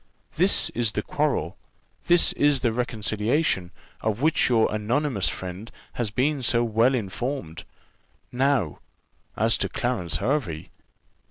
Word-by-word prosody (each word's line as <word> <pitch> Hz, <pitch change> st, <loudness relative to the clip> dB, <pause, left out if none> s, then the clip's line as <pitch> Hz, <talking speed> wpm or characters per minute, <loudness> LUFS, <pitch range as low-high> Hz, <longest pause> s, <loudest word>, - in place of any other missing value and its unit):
This -, -, +4 dB
is 115 Hz, -3 st, 0 dB
the -, -, -2 dB
quarrel, -, -, -1 dB, 0.5 s
this 175 Hz, 0 st, +4 dB
is 145 Hz, -3 st, +2 dB
the 120 Hz, -3 st, +1 dB
reconciliation, 110 Hz, -, -1 dB, 0.3 s
of 110 Hz, 0 st, -1 dB
which 155 Hz, 0 st, +2 dB
your 115 Hz, -3 st, +2 dB
anonymous 110 Hz, 0 st, 0 dB
friend 95 Hz, +4 st, -7 dB, 0.2 s
has 120 Hz, -3 st, -2 dB
been 135 Hz, +7 st, 0 dB
so 120 Hz, -1 st, +2 dB
well 115 Hz, +3 st, +2 dB
informed. 105 Hz, -, -4 dB, 0.7 s
Now, 125 Hz, -, 0 dB, 0.6 s
as 115 Hz, +2 st, +2 dB
to -, -, 0 dB
Clarence 120 Hz, -9 st, -2 dB
Hervey." 105 Hz, -, -2 dB
120 Hz, 120 wpm, -25 LUFS, 105-135 Hz, 0.7 s, This